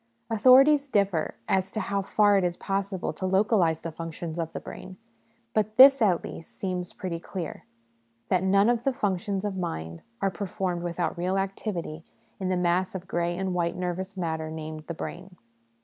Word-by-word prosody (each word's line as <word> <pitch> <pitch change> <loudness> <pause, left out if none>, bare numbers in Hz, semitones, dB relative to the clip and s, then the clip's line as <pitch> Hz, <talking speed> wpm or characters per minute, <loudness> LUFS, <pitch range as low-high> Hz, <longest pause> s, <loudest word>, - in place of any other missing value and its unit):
Authorities 270 +6 +6
differ 195 -8 +1
as 190 0 +1
to 220 - -2
how 200 -1 -1
far 205 +1 +3
it 195 - +3
is 175 -1 -1
possible 195 -1 -2
to 185 - -3
localise 190 -4 +2
the 165 - -5
functions 165 +1 -6
of 165 -1 -2
the - - -5
brain; 185 0 -10 0.6
but 215 0 0
this 270 0 +9
at 190 -6 +3
least 165 - -9
seems 180 -2 -3
pretty 175 -3 -5
clear 175 -1 -6 0.6
that 185 -2 +2
none 195 +2 +4
of 240 -1 +2
the 270 - +1
functions 195 -2 -1
of 200 -2 -2
mind 80 - -4 0.2
are 195 - +1
performed 185 -2 -3
without 170 -1 -2
real 185 +2 0
activity 190 -5 -3 0.4
in 190 -1 -2
the 185 - +1
mass 180 +2 +1
of 185 -1 -6
grey 175 -2 -1
and 190 -1 -1
white 170 -1 0
nervous 185 +2 -4
matter 160 -3 -2
named 155 -1 -7
' - - -35
the 170 - -4
brain.' 180 +3 -7
185 Hz, 180 wpm, -27 LUFS, 170-200 Hz, 0.6 s, this